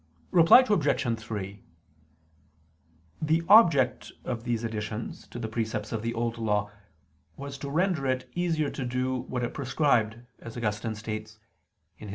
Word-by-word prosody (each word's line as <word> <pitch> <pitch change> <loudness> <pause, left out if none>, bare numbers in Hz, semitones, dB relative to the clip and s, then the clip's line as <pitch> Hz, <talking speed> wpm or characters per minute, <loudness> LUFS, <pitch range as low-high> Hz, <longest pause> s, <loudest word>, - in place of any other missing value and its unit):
Reply 175 +9 +7
Obj. 140 - +1
3: 100 -3 -6 1.6
The 160 +2 +2
object 165 - +5
of 120 -1 -4
these 120 -1 -1
additions 110 0 -5
to - - -9
the 115 -2 -3
precepts 110 -1 -3
of 115 - -2
the 115 +1 -3
Old 115 0 -2
Law 105 -2 0 0.7
was 140 0 -7
to 140 - -5
render 165 -2 +1
it 130 0 -1
easier 165 -4 0
to 135 - -5
do 125 +1 -1
what 125 0 -4
it 120 - -3
prescribed, 130 -5 +1 0.2
as 115 0 -9
Augustine 110 0 -2
states 110 0 -6 0.6
[*De - - -9
Serm. - - -8
120 Hz, 150 wpm, -28 LUFS, 110-140 Hz, 1.6 s, Reply